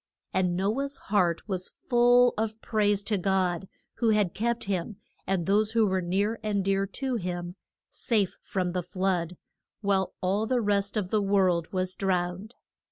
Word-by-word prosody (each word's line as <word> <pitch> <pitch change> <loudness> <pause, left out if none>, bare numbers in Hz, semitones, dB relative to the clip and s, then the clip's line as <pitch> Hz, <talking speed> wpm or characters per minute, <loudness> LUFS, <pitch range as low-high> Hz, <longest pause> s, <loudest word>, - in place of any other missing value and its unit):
And 180 -2 +1
No 205 +8 0
ah's 280 0 -3
heart 185 -4 0
was 185 -3 -2 0.2
full 245 0 +5
of 220 0 -2
praise 205 -3 +1
to 210 -1 0
God, 190 -1 0 0.3
who 230 -1 +2
had 210 -5 +2
kept 235 +2 -1
him, 195 +1 -2 0.3
and 185 -3 0
those 210 +3 +2
who 225 -2 +4
were 190 -2 +1
near 200 +6 0
and 205 -3 -1
dear 195 0 +1
to 255 +5 -2
him, 175 -2 -4 0.3
safe 210 -6 -1
from 185 -2 -2
the 180 0 -1
flood, 180 -1 -1 0.4
while 195 -2 0
all 200 +4 0
the 255 0 +2
rest 205 -1 0
of 195 -4 -1
the 215 +1 +2
world 190 -4 +2
was 185 -1 -1
drowned. 185 +3 -2
195 Hz, 165 wpm, -27 LUFS, 185-215 Hz, 0.4 s, full